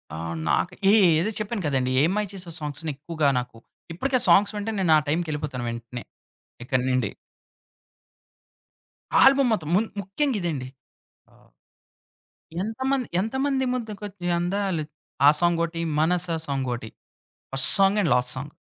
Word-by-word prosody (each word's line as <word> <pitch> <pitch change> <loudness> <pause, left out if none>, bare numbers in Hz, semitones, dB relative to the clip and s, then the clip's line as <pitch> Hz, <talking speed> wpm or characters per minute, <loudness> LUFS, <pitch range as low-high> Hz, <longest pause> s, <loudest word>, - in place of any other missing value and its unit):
ఆ! - - -6 0.3
నాకు 170 - 0 0.2
ఏ - - +5 0.3
ఏదో 200 +7 -1
చెప్పాను 215 0 -3
కదండీ. 130 -3 0
'ఏం 165 - +2
మాయ 210 -1 -1
చేసావే' 180 -4 -7
సాంగ్స్‌ని 150 +2 -4
ఎక్కువగా 155 +1 -2
నాకు 125 -2 -8 0.4
ఇప్పటికి 260 +10 -2
ఆ - - +3
సాంగ్స్ 205 +1 +5
వింటే 210 +2 -3
నేను 180 -4 +2
ఆ - - +4
టైమ్‌కెళ్ళిపోతాను 150 -5 -2
వెంటనే, 115 +1 -7 0.6
ఇక్కడి 125 0 0
నుండి. 125 -5 +1 2.1
ఆల్బమ్ 270 -1 +5
మొత్తం 155 -8 -3
మున్ 220 +4 +2
ముఖ్యంగా 220 +7 -1
ఇదండి. 150 -7 -3 0.6
ఆహ్, - - -25 1.1
ఎంతమంది, 260 +3 -2
ఎంతమంది 265 +4 -1
ముద్దకొచ్చి 205 -6 -6
అందాలు 185 -2 -1 0.4
ఆ - - +10
సాంగొటి, 170 -1 0 0.2
మనసా 170 +1 +1
సాంగొటి. 125 -5 -3 0.6
First 135 0 +5
song 195 +2 +4
and 170 - 0
last 125 0 +2
song. 145 +3 -6
175 Hz, 130 wpm, -24 LUFS, 140-210 Hz, 2.1 s, ఆ